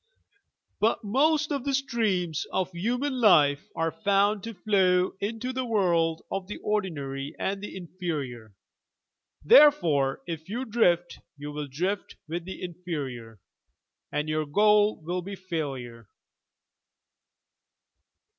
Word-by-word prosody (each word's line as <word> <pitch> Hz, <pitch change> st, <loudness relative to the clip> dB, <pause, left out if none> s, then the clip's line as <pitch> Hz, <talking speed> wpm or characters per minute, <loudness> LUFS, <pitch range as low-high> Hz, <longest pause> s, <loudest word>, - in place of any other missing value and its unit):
But 220 Hz, +2 st, +1 dB
most 300 Hz, +8 st, +2 dB
of 280 Hz, -3 st, -1 dB
the 275 Hz, -1 st, 0 dB
streams 210 Hz, -, -1 dB
of 185 Hz, -1 st, -1 dB
human 245 Hz, +9 st, -1 dB
life 145 Hz, -9 st, +5 dB
are 165 Hz, 0 st, 0 dB
found 205 Hz, +1 st, +2 dB
to 230 Hz, -1 st, -6 dB
flow 185 Hz, -3 st, +2 dB
into 225 Hz, +5 st, -3 dB
the 260 Hz, 0 st, -2 dB
world 170 Hz, -8 st, +1 dB
of 195 Hz, -1 st, -3 dB
the 210 Hz, -, -6 dB
ordinary 150 Hz, -9 st, -3 dB
and 195 Hz, +1 st, -2 dB
the 205 Hz, -, -7 dB
inferior. 150 Hz, -, -5 dB, 0.9 s
Therefore 170 Hz, -, +5 dB
if 165 Hz, 0 st, -6 dB
you 245 Hz, +5 st, -3 dB
drift 175 Hz, -7 st, +1 dB, 0.2 s
you 145 Hz, +1 st, -7 dB
will 150 Hz, 0 st, -5 dB
drift 180 Hz, +9 st, -3 dB
with 170 Hz, +2 st, -4 dB
the 190 Hz, 0 st, -7 dB
inferior, 140 Hz, -, -6 dB, 0.7 s
and 150 Hz, +1 st, -1 dB
your 155 Hz, -1 st, -1 dB
goal 210 Hz, +5 st, +4 dB
will 180 Hz, +3 st, -2 dB
be 195 Hz, +3 st, -7 dB
failure." 135 Hz, -, -5 dB
180 Hz, 120 wpm, -27 LUFS, 155-210 Hz, 0.9 s, life